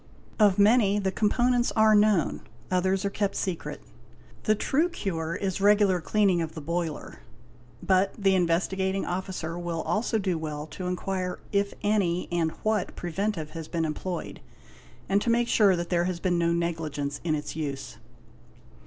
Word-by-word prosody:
Of 205 -3 +5
many 205 -1 +4
the 195 -2 0
components 240 +4 +2
are 220 0 +5
known, 210 -5 +3 0.3
others 190 +2 +1
are 200 - 0
kept 200 -1 -1
secret. 160 -5 -4 0.6
The 215 - +4
true 305 +10 +1
cure 170 - -3
is 195 0 -2
regular 200 -3 +4
cleaning 185 +2 +2
of 160 0 -4
the - - -5
boiler, 165 0 -4 0.6
but 190 +1 +3
the 195 -2 +3
Investigating 190 +2 +1
Officer 175 -2 -4
will 170 -2 -3
also 220 +1 0
do 185 -5 -1
well 150 -1 -4
to 180 +4 -6
inquire 180 0 -2
if 200 -1 0
any 195 -4 +1
and 170 -2 +1
what 215 -3 0
preventive 175 -2 -3
has 160 -1 -7
been 165 -1 -1
employed; 170 +3 -4 0.7
and 200 +1 +2
to 235 - -1
make 235 +1 +2
sure 200 -5 +4
that 170 0 -4
there 175 -1 +2
has 180 -1 -2
been 175 -1 +1
no 170 0 +2
negligence 160 -4 -2
in 160 -2 +1
its 150 0 -5
use. 140 -4 -5
185 Hz, 160 wpm, -27 LUFS, 170-205 Hz, 0.7 s, Of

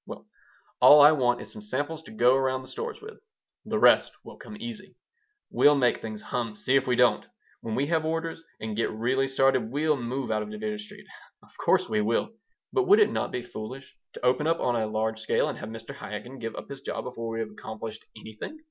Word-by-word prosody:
Well, - - -9 0.5
all 150 - +9
I 145 +1 +9
want 125 -5 +1
is - - -10
some 215 - -10
samples 160 -5 -3
to 210 - -13
go 130 - +4
around 130 -1 0
the - - -12
stores 465 -1 -5
with. 440 +1 -10 0.5
The - - -1
rest - - +5
will - - -12
come 210 - -10
easy. 210 -5 -8 0.6
We'll 145 0 +5
make 125 -3 +2
things 110 -1 -6
hum. 115 -3 -3
See 130 +5 0
if 135 0 +3
we 125 - +2
don't. - - +3 0.4
When 110 -1 -4
we 140 - +1
have 160 0 +1
orders 165 +1 -2 0.2
and 110 -1 -4
get 115 - 0
really 130 +5 0
started 135 -3 +2
we'll 150 +2 +2
move 125 +1 -3
out 110 0 +1
of 105 - -6
Division 105 0 -4
Street. 105 - -11 0.4
Of - - -22
course - - +3
we 105 -1 +1
will. 110 +2 0 0.4
But 390 -2 +2
would 410 +3 +7
it 425 - +5
not - - -2
be 125 - -3
foolish 125 +4 -8 0.2
to - - -6
open 130 +5 +2
up 165 +1 +2
on 125 - +1
a 110 -2 0
large 110 +1 -1
scale 110 - +1
and - - -6
have - - -7
Mr. 115 +4 -8
Chaikin 125 +2 -7
give 115 -1 -5
up - - -8
his 140 -1 -8
job - - -4
before 115 -2 -5
we 115 - -3
have 110 -1 -5
accomplished 110 +1 -8
anything? 110 - -9
130 Hz, 225 wpm, -27 LUFS, 110-150 Hz, 0.6 s, all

